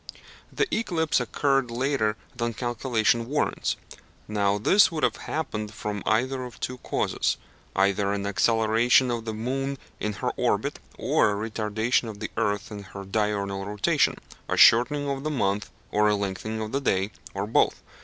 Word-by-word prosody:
The 430 - +1
eclipse 170 -8 +1
occurred 135 -3 +1
later 120 -3 0 0.2
than 120 -1 -2
calculation 120 -1 +1
warrants. 150 +1 0 0.5
Now 100 -1 +1
this 190 - +5
would 160 -2 -3
have - - +2
happened 110 -9 -3
from 105 -1 -4
either 130 +4 +1
of 125 -1 -9
two 125 0 -4
causes, - - 0 0.4
either 100 +1 +2
an 100 0 -2
acceleration 115 +5 +3
of 115 -1 -3
the 110 - -3
moon 135 +5 -2 0.2
in 105 - -2
her - - -2
orbit, - - 0 0.2
or - - +3 0.2
a - - -5
retardation 110 +2 0
of 105 -2 -8
the 110 - -5
earth 100 +1 -1
in 105 -1 -6
her 100 0 -9
diurnal 100 -1 -1
rotation 100 0 +1 0.3
a - - 0
shortening 145 +5 +6
of 135 -1 -2
the 155 - -1
month 105 -7 0 0.2
or 105 0 +3
a 105 - +3
lengthening 100 +2 -3
of 110 0 -4
the 140 - -1
day, 95 -4 +1 0.2
or 100 +1 -1
both. 110 - +2
110 Hz, 165 wpm, -26 LUFS, 105-130 Hz, 0.5 s, shortening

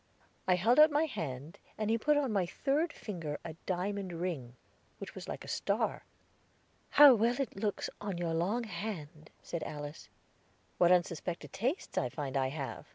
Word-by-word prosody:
I 185 - +5
held 225 - +4
out 305 +1 +9
my 295 +1 +2
hand, 160 - -5 0.2
and 215 0 0
he 230 - +3
put 295 +5 +3
on 270 -6 +1
my 190 -4 +1
third 295 - 0
finger 165 -8 -5
a 165 - -5
diamond 190 0 -2
ring, 165 -9 -4 0.4
which - - -8
was - - -8
like - - -5
a - - -12
star. - - -1 0.8
"How 290 -2 +9
well 235 +3 +2
it 275 - -2
looks 200 0 -1
on 200 -4 -3
your 170 -1 -1
long 195 +9 0
hand!" 160 -9 -6
said 170 - -4
Alice. 145 0 -6 0.7
"What 175 0 +6
unsuspected 175 -1 0
tastes 260 - -1
I 125 - -1
find 140 +1 -5
I 135 -1 +2
have!" 135 0 -5
185 Hz, 170 wpm, -32 LUFS, 160-230 Hz, 0.8 s, out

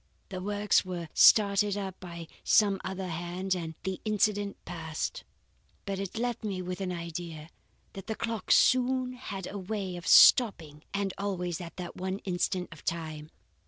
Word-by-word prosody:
The 185 -2 -5
works 205 +1 +2
were 175 -3 -5
started 205 -1 +5
up 190 -2 -5
by 170 -2 -8 0.2
some 200 -3 +4
other 190 0 -4
hand, 175 +3 -2
and 165 -3 -4
the 190 -1 -3
incident 210 -1 0
passed. 165 - -4 0.6
But 195 -2 -3
it 195 +2 -5
left 240 0 -2
me 200 -3 -3
with 180 +1 -5
an 185 -1 -2
idea. 170 -2 -6 0.4
That 195 +1 -9
clock 225 -4 -4
soon 255 0 +4
had 200 -7 -6
a 200 - -6
way 190 -1 -4
of 175 - -8
stopping 160 - +6
and 200 -1 -1
always 180 -4 -2
at 170 -1 -9
that 180 -2 -6
one 190 +1 -3
instant 180 0 -1
of 165 - -12
time. 155 -2 -4
190 Hz, 160 wpm, -29 LUFS, 175-205 Hz, 0.6 s, stopping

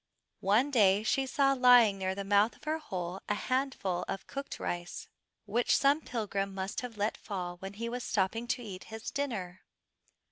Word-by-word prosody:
One 225 +9 +3
day 205 -5 +4
she 265 +4 +1
saw 275 +1 +3
lying 245 -6 +6
near 190 0 -1
the 200 - -4
mouth 205 +3 +3
of - - -23
her 315 +1 -1
hole 185 - -5
a 210 - +2
handful 255 -9 -1
of 195 - -4
cooked 275 0 -6
rice 175 0 -4 0.4
which 240 +1 +2
some 280 +3 +3
pilgrim 200 -6 -3
must 190 +1 -3
have 245 -3 -7
let 210 +2 0
fall 180 -3 -5
when 195 +2 -7
he 230 +3 -4
was 245 +1 -4
stopping 220 +3 0
to 245 +1 -1
eat 190 -4 -8
his 220 0 -7
dinner. 210 -11 -3
215 Hz, 180 wpm, -31 LUFS, 190-250 Hz, 0.4 s, lying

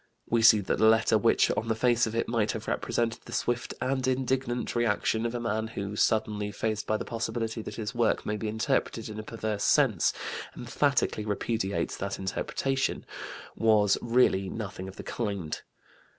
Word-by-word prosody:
We 115 0 +2
see 110 -2 +7
that 95 - -1
the 110 - +6
letter 110 0 +4
which, 115 +1 +4
on 115 - -2
the 110 - +1
face 120 0 +3
of 110 - -4
it, 115 - 0
might 110 -3 +1
have - - -6
represented 115 -1 -1
the - - -10
swift 120 0 -1
and 130 0 0
indignant 130 -1 -1
reaction 115 0 +1
of 120 - -5
a - - -1
man 110 -1 -1
who, 100 -2 -5
suddenly 105 -1 +1
faced 110 0 -2
by 110 - +1
the - - -5
possibility 115 0 -3
that - - -7
his 110 +1 -4
work 120 -2 +1
may 105 - -1
be 110 +1 -3
interpreted 110 +1 -1
in 110 0 -6
a - - -5
perverse 110 -2 -3
sense, 125 - +4 0.5
emphatically 105 - 0
repudiates 105 -1 -1
that 100 0 -3
interpretation, 135 +7 -1 0.5
was 105 -3 +4
really 115 -6 +3
nothing 100 -3 -5
of 95 - -9
the - - -8
kind. 100 -9 -3
110 Hz, 180 wpm, -28 LUFS, 105-120 Hz, 0.5 s, see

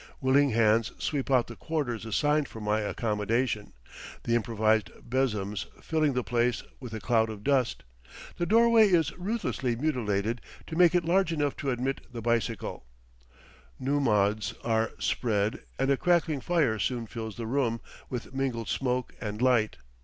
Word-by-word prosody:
Willing 140 +2 +4
hands 115 0 +3
sweep 140 -3 -2
out 130 -3 +4
the 120 - -9
quarters 125 -9 -3
assigned 145 +6 +2
for 110 - -10
my 105 0 0
accommodation, 105 +1 -1 0.5
the 115 - 0
improvised 110 -2 +2 0.2
besoms 105 -6 -1
filling 155 -3 +1
the 125 -1 0
place 120 0 0 0.2
with 125 -4 -8
a - - -4
cloud 110 +1 +2
of 105 -2 -7
dust; 135 -4 +1 0.5
the 175 - -1
doorway 230 0 +6
is 165 -6 +2
ruthlessly 180 - -2
mutilated 115 -5 -1 0.2
to 160 - -6
make 175 0 +5
it 175 -2 +2
large 180 0 +2
enough 145 -3 0
to 140 - -2
admit 130 +2 -1
the 120 - -6
bicycle; 115 - -2 0.9
nummuds 110 -5 +1
are 115 -1 +1
spread 105 -3 0 0.2
and 135 +1 +1
a 135 - +3
crackling 165 -4 +2
fire 140 -8 +1
soon 120 +2 -1
fills 110 -1 -6
the 115 - -4
room 115 -1 0 0.3
with 125 0 -5
mingled 130 -4 -2
smoke 125 -1 -1
and 105 -1 -4
light. 120 -4 +2
120 Hz, 155 wpm, -28 LUFS, 110-140 Hz, 0.9 s, doorway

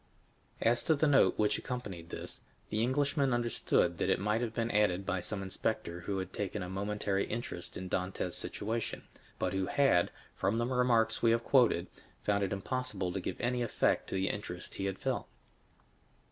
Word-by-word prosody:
20029m - - -6
As 120 - 0
to 160 - +3
the 155 +2 +2
note 135 -10 +5
which 105 -1 +3
accompanied 100 -10 -5
this, - - -6 0.3
the 110 +1 +1
Englishman 135 +1 +2
understood 120 -1 +1
that - - +1
it - - +3
might 105 +3 +1
have 120 -2 -1
been 115 0 -1
added 100 -3 +2
by 95 -1 -1
some 95 0 -3
inspector 95 -2 -2
who 95 +3 -3
had 95 -1 -4
taken 100 -1 -3
a 90 - -5
momentary 100 0 -1
interest 110 -6 -5
in 95 - -5
Dantès' 90 -1 -2
situation, 110 +2 -2 0.3
but 90 0 -1
who 95 -1 0
had, 135 -12 +4 0.3
from 110 - +1
the 120 - +1
remarks 120 -3 +2
we 115 - +5
have 115 +1 +3
quoted, 120 -11 +4 0.4
found 100 -1 +2
it 95 - -1
impossible 100 -2 -2
to 95 - -1
give 90 - -4
any 125 0 0
effect 120 - +1
to - - -3
the 95 0 +1
interest 90 -3 -5
he 95 - -3
had 95 -1 -2
felt. - - -2
105 Hz, 190 wpm, -32 LUFS, 95-120 Hz, 0.4 s, note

